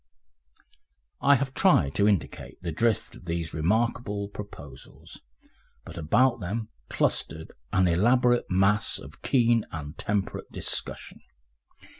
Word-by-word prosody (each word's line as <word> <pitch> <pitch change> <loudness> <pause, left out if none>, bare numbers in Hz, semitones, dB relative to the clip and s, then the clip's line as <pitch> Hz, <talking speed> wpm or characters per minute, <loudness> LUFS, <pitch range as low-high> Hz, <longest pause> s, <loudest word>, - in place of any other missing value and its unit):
I 140 0 +6
have 135 0 -2
tried 160 - +3
to 100 - +3
indicate 100 -6 -2
the 85 - -2
drift 110 +7 0
of - - -14
these 85 -1 -3
remarkable 100 +4 0
proposals, 100 0 -10 0.6
but - - -10
about 115 +11 +2
them 105 +5 -4 0.2
clustered 80 0 -1 0.2
an 95 -1 +3
elaborate 120 +7 +3
mass 100 +3 +2
of - - -12
keen 120 -3 +3
and 75 -1 -6
temperate 100 -1 -2
discussion. - - -4
105 Hz, 115 wpm, -27 LUFS, 85-120 Hz, 0.6 s, I